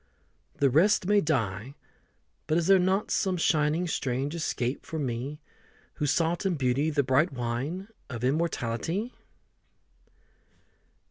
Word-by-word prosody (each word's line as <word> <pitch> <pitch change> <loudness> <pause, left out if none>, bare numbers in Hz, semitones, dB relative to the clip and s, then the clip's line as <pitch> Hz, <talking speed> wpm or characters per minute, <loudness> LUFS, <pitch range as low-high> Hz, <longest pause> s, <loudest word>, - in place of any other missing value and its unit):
The 140 -2 +2
rest 180 +7 +4
may 205 +1 +4
die 120 - -1 0.7
but 155 +1 +2
is 170 - +1
there 195 +1 +6
not 190 +3 +1
Some 190 -2 +1
shining 160 +1 +2
strange 135 -1 -2
escape 135 -6 -2
for 160 - -6
me 135 +1 -3 0.6
Who 150 - 0
sought 165 +5 +1
in 190 -3 +1
Beauty 135 +2 +1
the 145 -2 +1
bright 135 +6 +2
wine 135 +9 -3 0.2
Of 120 -3 -6
immortality? 160 - -1
150 Hz, 125 wpm, -28 LUFS, 130-175 Hz, 0.7 s, there